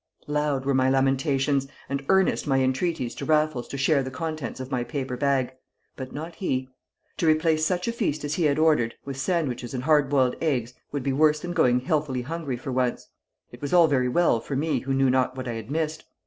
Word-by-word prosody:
Loud 150 -2 -1
were 140 - +1
my 130 0 +3
lamentations, 135 +1 +1 0.2
and 140 0 -3
earnest 190 -4 +3
my 135 -2 +2
entreaties 130 0 0
to - - -7
Raffles 155 -5 +1
to 140 - -6
share 140 +1 +3
the 130 - -4
contents 155 -2 -5
of 130 +1 -7
my 125 -2 0
paper 135 -1 -4
bag; 130 -1 0 0.4
but 130 -1 -7
not 160 +3 -6
he. 130 -9 -2 0.5
To 165 - 0
replace 155 0 +3
such 180 +1 -1
a - - +1
feast 190 -11 -2
as 145 0 -2
he 170 0 +1
had 145 -1 +2
ordered 150 -7 +2
with 140 -1 -5
sandwiches 135 -7 -1
and 125 - -3
hard 150 -2 +3
boiled 130 -3 +2
eggs 125 -7 0 0.2
would 145 -3 -3
be 135 - 0
worse 150 +2 +3
than 175 0 -4
going 125 -7 +3
healthily 135 -3 -1
hungry 150 -2 -4
for 130 +2 -6
once; 125 -1 -1 0.4
it 120 - -13
was 145 +2 -3
all 175 -2 +7
very 130 -4 +1
well 145 -4 +3
for 135 +4 -5
me 155 +4 0
who 135 0 -3
knew 135 -1 +3
not 130 0 +1
what 130 - -5
I 120 - -2
had 115 0 -7
missed. 155 +1 -2
140 Hz, 220 wpm, -25 LUFS, 130-155 Hz, 0.5 s, all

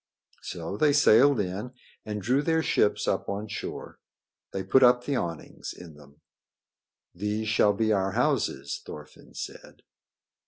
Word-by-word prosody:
So 85 +3 -6
they 150 +2 +3
sailed 140 -1 +5
in 100 +6 -4 0.3
and 105 -2 -4
drew 130 +6 +2
their 160 +1 +1
ships 105 - +1
up - - -1
on 100 +2 -3
shore. - - -7 0.5
They 95 - -3
put 115 +8 +4
up 125 -1 +5
the 140 +2 -2
awnings 85 -9 -5
in 85 -3 -12
them. 75 0 -18 0.9
"These 105 +4 -3
shall 105 -1 +3
be 110 +1 +1
our 95 -1 0
houses," 115 - -1
Thorfinn 75 0 -12
said. - - -9
105 Hz, 145 wpm, -27 LUFS, 90-125 Hz, 0.9 s, sailed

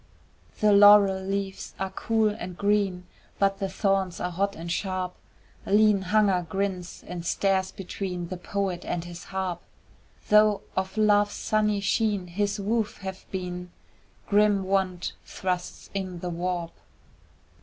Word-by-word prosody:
The 210 -1 +5
laurel 200 -1 +7
leaves 195 0 -4
are 190 0 -2
cool 220 +2 +1
and 185 -4 -6
green, 200 -3 +1 0.3
But 195 0 +1
the 195 - -2
thorns 195 -2 0
are 180 - -2
hot 200 +3 -1
and 170 +1 -6
sharp, 185 0 -2 0.5
Lean 210 0 +4
Hunger 190 -1 +2
grins 190 -2 -3
and 175 -1 -5
stares 190 +1 +1
between 180 -2 -5
The 185 - -4
poet 190 0 -3
and 170 - -3
his 175 0 -9
harp; 190 -2 -3 0.7
Though 210 -1 +5
of 190 +2 -2
Love's 205 -1 +3
sunny 210 -1 +1
sheen 205 -2 +1
his 200 +4 -1
woof 215 +2 -1
have 190 -1 -6
been, 180 -1 -5 0.6
Grim 205 -1 +3
want 190 -2 -1
thrusts 180 -2 -4
in 190 -2 -3
the 180 - -3
warp. 175 0 -2
195 Hz, 135 wpm, -26 LUFS, 180-205 Hz, 0.7 s, laurel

